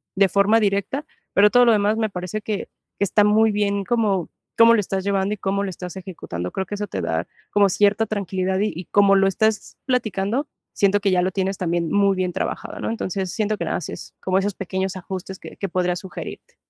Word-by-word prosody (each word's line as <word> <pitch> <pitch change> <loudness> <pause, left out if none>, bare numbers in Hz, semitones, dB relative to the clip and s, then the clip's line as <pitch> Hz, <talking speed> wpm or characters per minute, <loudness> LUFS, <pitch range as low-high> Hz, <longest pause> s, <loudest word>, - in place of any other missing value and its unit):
de 195 0 +4
forma 200 +4 +4
directa, 200 +8 0 0.3
pero 205 +1 +6
todo 245 +2 +5
lo 235 - +6
demás 210 +1 +2
me 220 -1 0
parece 180 +2 -4
que 210 -1 -4 0.3
que - - 0
está 205 +1 +3
muy 215 +1 +4
bien 200 -1 0
como, 205 -5 0 0.3
cómo 230 0 +8
lo 230 - +4
estás 195 -1 -2
llevando 200 0 0
y - - -5
cómo 200 +1 -1
lo - - -3
estás 180 0 -7
ejecutando. 160 - -6
Creo 190 - -2
que 205 - -5
eso 205 0 -4
te 95 - -4
da 85 0 -2 0.2
como 205 -1 +5
cierta 205 +3 +3
tranquilidad 190 -2 -1
y 210 +1 +1
y, 175 +3 -7
como 200 +2 +4
lo 195 0 +4
estás 220 +2 0
platicando, 245 +1 0 0.3
siento 200 0 +2
que 200 -1 +2
ya 180 -1 +3
lo 185 +1 0
tienes 190 0 -1
también 170 -2 -1
muy 200 -1 +3
bien 185 -1 -1
trabajado, - - -4
¿no? - - -2
Entonces, 190 -4 -3
siento 215 -1 -1
que 170 - -3
la - - -1
haces 170 - -6
como 185 0 +1
esos 200 +1 -1
pequeños 190 0 -3
ajustes 185 0 -6
que - - -11
que 195 - -3
podría 180 0 0
sugerirte. 190 0 -9
195 Hz, 220 wpm, -22 LUFS, 185-210 Hz, 0.3 s, cómo